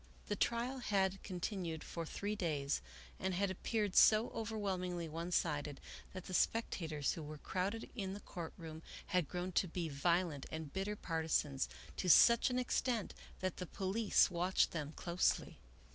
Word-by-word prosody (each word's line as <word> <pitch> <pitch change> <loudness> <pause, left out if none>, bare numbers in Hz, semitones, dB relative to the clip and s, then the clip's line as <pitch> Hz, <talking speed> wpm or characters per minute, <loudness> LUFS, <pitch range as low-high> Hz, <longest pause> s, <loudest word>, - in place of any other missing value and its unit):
The - - +1
trial 245 +3 0
had 195 -4 +1
continued 180 -3 -3
for 165 -1 -5
three 205 +5 -3
days 150 -7 0 0.4
and 190 -1 -1
had 195 +1 +1
appeared 205 +1 -1
so 215 +2 +7
overwhelmingly 190 -6 -2
one 165 +3 -4
sided 145 -4 0 0.3
that 185 -1 -7
the 185 - -7
spectators 165 -9 +1
who 165 - -6
were 155 0 -7
crowded 195 +8 -2
in 195 -4 -3
the - - -6
court 170 -4 -7
room 160 -2 -8 0.3
had 180 -5 +2
grown 180 +1 -3
to 185 - +2
be 170 -1 -3
violent 165 0 +1
and 160 -3 -5
bitter 195 +2 -1
partisans, 160 -6 0 0.3
to 185 - 0
such 235 - +7
an 250 - 0
extent 245 -3 0 0.3
that 185 -2 -1
the 180 - -4
police 195 +3 +2
watched 180 +2 +2
them 150 -3 -3
closely. 170 - 0
180 Hz, 160 wpm, -37 LUFS, 160-200 Hz, 0.4 s, so